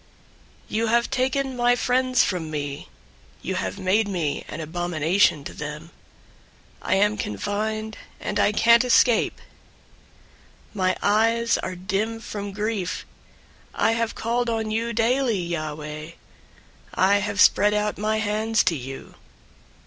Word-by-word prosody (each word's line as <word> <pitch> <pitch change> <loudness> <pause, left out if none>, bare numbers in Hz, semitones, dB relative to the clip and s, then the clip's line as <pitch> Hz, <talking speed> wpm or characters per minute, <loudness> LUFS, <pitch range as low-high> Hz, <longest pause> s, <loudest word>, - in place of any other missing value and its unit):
088:008 - - -21
You 225 0 +1
have 235 +1 +2
taken 265 0 0
my 245 0 +3
friends 255 0 +2
from 170 -4 -2
me. 145 -2 -5 0.5
You 190 - -2
have 185 +1 -3
made 200 +3 +1
me 170 -7 -2
an - - -7
abomination 165 0 +1
to - - -8
them. 150 +3 -7 0.9
I - - +1
am 210 +2 +2
confined, 215 - -3 0.2
and - - -3
I - - +4
can't 235 +3 +5
escape. 245 -1 +3 1.3
088:009 - - -29
My 185 -3 0
eyes 230 +3 +2
are 185 - -4
dim 210 +5 -2
from 205 -3 -6
grief. 205 -3 -3 0.7
I - - +2
have 230 0 -1
called 240 +1 -1
on 220 -1 -2
you 230 +2 -1
daily, 235 0 +1
Yahweh. 155 -2 -5 0.8
I 195 +2 +4
have 205 0 -3
spread 210 0 +5
out 210 0 -1
my 215 +1 0
hands 215 +1 +1
to 165 - +1
you. 135 -1 -8
210 Hz, 135 wpm, -24 LUFS, 175-230 Hz, 1.3 s, can't